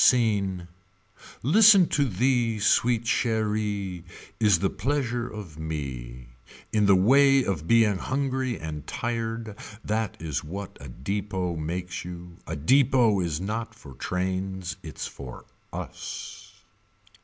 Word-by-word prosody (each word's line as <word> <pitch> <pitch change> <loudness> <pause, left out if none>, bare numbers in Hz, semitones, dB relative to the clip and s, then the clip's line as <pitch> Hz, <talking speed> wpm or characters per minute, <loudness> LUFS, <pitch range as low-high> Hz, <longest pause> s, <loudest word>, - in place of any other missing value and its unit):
Scene. 100 -7 +3 0.8
Listen 195 - +7
to 145 - +2
thee 120 +1 +1
sweet 115 +2 +3
cheerie 105 -6 -1 0.4
Is 105 -5 +5
the 95 +3 0
pleasure 125 -4 -1
of 95 -8 -9
me. 65 -6 -5 0.4
In 105 -2 +3
the 100 - +7
way 135 +7 +5
of 90 -7 -2
being 110 -4 +4
hungry 130 -1 -1
and 75 -2 -6
tired 115 -2 -3 0.3
That 110 0 -1
is 80 -4 -3
what 95 +5 -7
a 70 - -8
depot 95 +6 -3
makes 90 +3 -4
you 90 -1 -9
A - - -3
depot 120 - +4
is 85 -4 -1
not 110 +3 -4
for 70 -10 -12
trains 95 +3 -3
Its - - -6
for 65 -3 -9 0.3
us. - - -7
100 Hz, 120 wpm, -26 LUFS, 90-120 Hz, 0.8 s, Listen